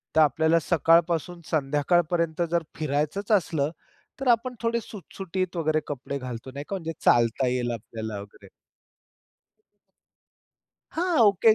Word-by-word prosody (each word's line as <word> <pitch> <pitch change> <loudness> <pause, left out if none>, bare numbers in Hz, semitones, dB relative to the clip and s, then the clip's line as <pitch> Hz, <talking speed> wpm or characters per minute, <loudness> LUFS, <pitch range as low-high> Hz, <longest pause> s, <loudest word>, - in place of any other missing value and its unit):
तर 160 - +6
आपल्याला 160 +3 +4
सकाळपासून 170 +1 +2
संध्याकाळपर्यंत 160 +3 +1
जर 170 -1 +1
फिरायचंच 155 +7 -1
असलं, 160 -7 +2 0.5
तर 270 - -3
आपण 245 +2 +2
थोडे 230 0 +1
सुटसुटीत 185 -3 -5
वगैरे 155 -1 +1
कपडे 140 0 -4
घालतो 125 -1 -7
नाही 140 +1 -6
का 200 - -2
म्हणजे 165 -3 -4
चालता 120 +2 +3
येईल 125 -1 0
आपल्याला 110 -2 -6
वगैरे. 100 0 -15 2.4
हां, 345 -1 +1
ओके 210 +3 +5
160 Hz, 120 wpm, -26 LUFS, 140-185 Hz, 2.4 s, तर